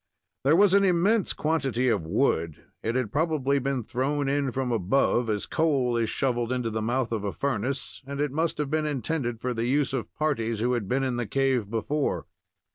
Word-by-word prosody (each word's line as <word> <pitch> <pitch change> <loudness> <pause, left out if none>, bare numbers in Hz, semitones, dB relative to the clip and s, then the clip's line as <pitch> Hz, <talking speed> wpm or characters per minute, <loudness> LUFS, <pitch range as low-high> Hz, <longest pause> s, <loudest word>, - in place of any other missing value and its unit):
There 145 +4 +5
was 195 +1 +5
an 200 0 +5
immense 195 +3 +3
quantity 135 -6 0
of 100 -9 +1
wood; 85 - 0 0.2
it 115 +2 -2
had 125 -5 -1
probably 145 -3 +1
been 135 -2 -1
thrown 135 +5 -1
in 140 0 +1
from 130 0 -2
above, 115 +3 +2
as 105 -1 -1
coal 135 -7 +1
is 115 -2 +1
shoveled 120 -3 0
into 125 -3 -1
the 110 0 -2
mouth 120 +2 0
of 110 -3 -2
a 100 - -1
furnace, 135 +1 -3
and 140 0 -5
it 145 -2 0
must 160 +3 -1
have 150 -2 -2
been 155 0 +1
intended 135 -4 -2
for 125 +1 -2
the 115 0 -1
use 140 +1 +1
of 130 -4 -3
parties 115 -8 -1
who 120 +3 +1
had 115 -5 -2
been 135 +2 +1
in 130 -2 -1
the 120 -3 -2
cave 130 -3 +1
before. 140 +7 -1
130 Hz, 200 wpm, -27 LUFS, 115-145 Hz, 0.2 s, There